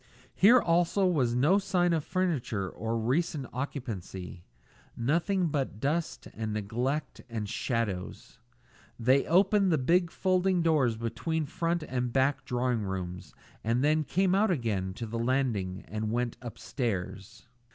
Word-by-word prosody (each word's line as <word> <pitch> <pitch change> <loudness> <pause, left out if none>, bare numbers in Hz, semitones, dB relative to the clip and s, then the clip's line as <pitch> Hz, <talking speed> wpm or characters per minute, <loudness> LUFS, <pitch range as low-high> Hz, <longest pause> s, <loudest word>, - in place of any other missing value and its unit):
Here 235 +6 +6
also 175 +1 +2
was 135 -10 +2
no 155 +11 +4
sign 175 -3 +1
of 160 -3 0
furniture 155 - -1
or 115 +5 -3
recent 140 +5 0
occupancy; 105 - -5 0.5
nothing 170 - +1
but 135 -8 -2
dust 155 +6 -2
and 110 -1 -4
neglect 120 +8 -2
and 110 -3 -3
shadows. 105 -4 -3 0.6
They 130 +4 +3
opened 195 +3 +4
the 160 - +3
big 170 +6 +2
folding 185 0 +1
doors 140 -9 +2
between 155 +8 -2
front 170 +3 -1
and 125 -3 -2
back 135 +1 +1
drawing 125 -2 0
rooms 90 -2 -5 0.3
and 115 +4 +1
then 155 +1 +3
came 185 +5 +1
out 205 +2 +3
again 105 - -1
to 115 - -5
the 115 +1 -4
landing 115 -7 -1
and 110 0 -3
went 120 0 -1
on 125 - -7
upstairs. 115 -2 -4
130 Hz, 140 wpm, -29 LUFS, 115-170 Hz, 0.6 s, Here